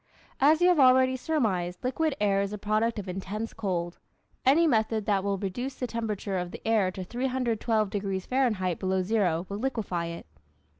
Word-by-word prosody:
As 310 +4 +5
you 355 - +6
have 355 -4 +3
already 260 0 +5
surmised, 210 - -1
liquid 290 +4 0
air 200 -1 +2
is 200 0 -2
a 210 - -4
product 215 +3 0
of 205 -2 -5
intense 195 +4 -4
cold. 180 -5 -3 0.4
Any 295 +6 +5
method 220 -6 +1
that 200 -2 +1
will 200 0 0
reduce 245 +8 -4
the 250 - -3
temperature 215 -5 -3
of 180 0 -4
the - - -9
air 215 -4 +3
to 185 0 -6
312 235 -2 -1
degrees 195 -2 -2
Fahrenheit 215 -10 0
below 190 -1 0
zero 180 -5 +1
will 200 +1 -5
liquefy 215 -9 -2
it. 170 0 -7
215 Hz, 180 wpm, -28 LUFS, 190-250 Hz, 0.4 s, you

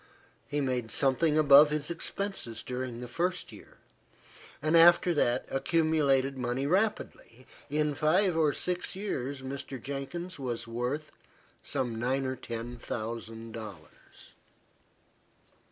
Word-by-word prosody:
He 145 0 -1
made 125 -4 -1
something 150 +5 +2
above 145 0 +8
his 150 +1 -2
expenses 170 - -4
during 125 -1 -5
the 125 - -6
first 175 +9 -2
year, - - -14 0.8
and 155 +3 +1
after 175 +1 +7
that 125 -4 +1
accumulated 140 -2 +2
money 125 +2 -1
rapidly. 175 - -1 0.2
In 150 0 +1
five 175 +5 +2
or 155 -2 +3
six 180 +4 -2
years, 140 -9 -4
Mr. 135 0 -5
Jenkins 140 +7 -5
was 120 -4 -3
worth 125 +6 -3 0.5
some 120 -3 -2
nine 130 +3 0
or 130 0 -2
ten 120 0 -6
thousand 115 0 -5
dollars. 105 -8 -11
135 Hz, 120 wpm, -30 LUFS, 120-155 Hz, 0.8 s, above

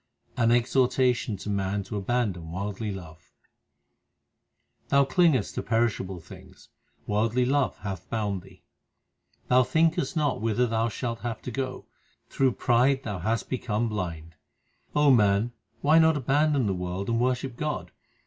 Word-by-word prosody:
1 115 -2 +2
An 120 - +6
exhortation 125 -2 +1
to 95 - -9
man 100 0 -1
to 95 - -7
abandon 100 -6 -1
worldly 100 +4 -4
love: 85 -4 -10 1.6
Thou 140 0 +4
clingest 140 - +2
to - - -3
perishable 110 -5 -1
things; 90 +2 -15 0.4
worldly 115 +4 +1
love 135 0 +1
hath 95 -3 -6
bound 105 -4 -2
thee. 95 0 -18 0.8
Thou 125 +1 +5
thinkest 160 +2 +1
not 145 -8 0
whither 115 +2 +1
thou 115 0 0
shalt 115 +1 -4
have 115 -2 -4
to 125 - -5
go: 130 +1 -4 0.4
through 135 -2 +2
pride 130 +4 +2
thou 105 -5 -4
hast 110 +5 -1
become 115 -3 -1
blind. 85 -6 -5 0.6
O 150 -1 +5
man, 105 -1 +3 0.3
why 155 +3 +5
not 160 -1 +4
abandon 145 0 +2
the 100 - +1
world 90 +1 -4
and 115 0 +1
worship 125 0 -1
God 150 +3 -3
115 Hz, 145 wpm, -27 LUFS, 100-130 Hz, 1.6 s, An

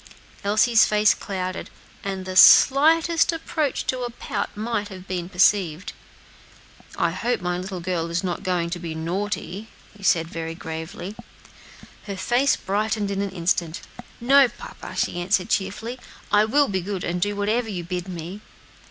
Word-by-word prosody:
Elsie's 220 +3 +4
face 210 -1 +4
clouded, 185 -1 -5 0.3
and 195 -1 -4
the 185 0 -5
slightest 325 - +6
approach 320 -3 -2
to 255 - -1
a 245 -1 -3
pout 235 - -5
might 215 -1 -2
have 190 -2 -11
been 180 -1 -4
perceived. 185 -2 +2 1.0
"I - - +1
hope 245 +1 -1
my 180 -1 -2
little 185 -1 -5
girl 170 -2 -2
is 170 +3 -1
not 180 -2 -2
going 175 -3 -1
to 175 - -3
be 165 -2 -5
naughty," 190 +4 -3 0.3
he 205 - -16
said, 165 -4 +2
very 165 0 -5
gravely. 165 +4 -7 0.9
Her 200 -1 -4
face 245 +8 +2
brightened 210 +1 -1
in 200 0 -1
an 200 - -2
instant. 170 -2 -1 0.4
"No, 270 +3 +6
papa," 240 - -10
she 175 - -1
answered 185 +1 +1
cheerfully, 220 +6 -2 0.3
"I 210 +1 +5
will 280 +6 +3
be 190 -2 -1
good, 190 0 -4
and 175 +1 -2
do 205 +2 0
whatever 220 +3 0
you 180 -4 -4
bid 180 +1 -4
me." 180 +3 -7
195 Hz, 160 wpm, -23 LUFS, 180-220 Hz, 1.0 s, slightest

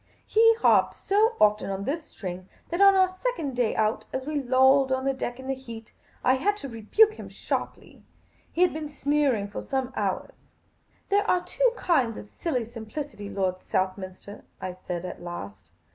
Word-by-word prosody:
He 455 +1 +5
harped 455 - +3
so 435 +4 +2
often 210 -1 +3
on 195 0 -3
this 305 +8 -2
string 185 -5 -7 0.2
that 345 +3 -1
on 395 0 +8
our 375 -1 +5
second 370 - -3
day 245 -3 +1
out, 215 0 +1
as 260 0 -3
we 295 -1 -1
lolled 265 +1 +4
on 260 0 0
deck 245 -1 -4
in 260 - -9
the 270 - -1
heat, 230 -4 -10 0.3
I 255 - +5
had 410 +10 +1
to 280 - -6
rebuke 275 - +3
him - - -8
sharply. - - -5 0.5
He 355 - +2
had 360 - +3
been 310 -1 -5
sneering 285 -7 +1
for 205 - -6
some 265 -1 -2
hours. - - -2 0.4
" - - -39
There 405 +1 +2
are 360 -1 +3
two - - +2
kinds 255 -10 +1
of - - -8
silly 250 +2 -3
simplicity, 230 -1 -7
Lord 185 -2 -1
Southminster," 185 +1 -3 0.2
I 185 - -4
said, 180 -1 -5
at 180 - -7
last. 100 - -8
260 Hz, 180 wpm, -26 LUFS, 205-325 Hz, 0.5 s, on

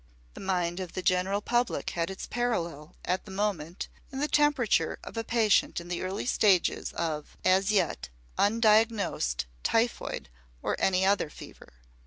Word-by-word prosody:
The - - -10
mind 180 -2 -1
of 185 -3 -6
the 185 - -4
general 185 +3 +1
public 240 +2 0
had 170 0 -1
its 190 - -6
parallel, 170 -10 -2
at 185 +1 -1
the - - -11
moment, 190 -4 -2 0.2
in 265 - -6
the 295 - +1
temperature 285 - +2
of - - -9
a 225 - -2
patient 225 -5 +2
in 170 0 -10
the 175 - -2
early 185 +2 -3
stages 200 -7 +2
of, 155 -3 -3
as 190 +2 +4
yet, 165 - 0 0.3
undiagnosed 215 - +2 0.2
typhoid 230 - 0 0.4
or - - 0
any 190 0 +3
other 195 -5 +2
fever. - - -13
190 Hz, 155 wpm, -29 LUFS, 175-225 Hz, 0.4 s, as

